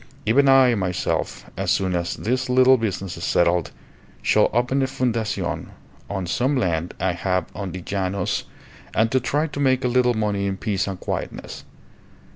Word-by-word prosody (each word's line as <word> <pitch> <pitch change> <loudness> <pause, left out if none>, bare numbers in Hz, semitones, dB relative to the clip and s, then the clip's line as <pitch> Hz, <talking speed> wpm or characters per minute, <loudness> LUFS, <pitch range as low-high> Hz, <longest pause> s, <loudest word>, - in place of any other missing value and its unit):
Even 135 +6 +4
I, 135 -2 +6
myself, 95 -4 -2
as - - -2
soon 95 -1 +1
as 85 0 -1
this 125 +3 -1
little 130 +1 +6
business 100 -6 -3
is 85 - -7
settled, 85 -2 +2 0.5
shall - - +4
open 125 +4 +1
a 135 - +1
fundacion 120 -4 -2 0.4
on 95 -2 -3
some 130 +10 0
land 85 -6 -1
I 95 +1 +1
have 90 0 -1
on 95 -2 -5
the 90 0 -7
llanos 95 -1 -2 0.5
and 110 +1 +2
try 145 +5 +1
to 145 -2 -6
make 130 -2 +2
a - - +4
little 125 -1 +2
money 105 -2 0
in 95 -1 -2
peace 100 -1 -1
and 95 -2 -4
quietness. - - -5
105 Hz, 165 wpm, -23 LUFS, 95-125 Hz, 0.5 s, I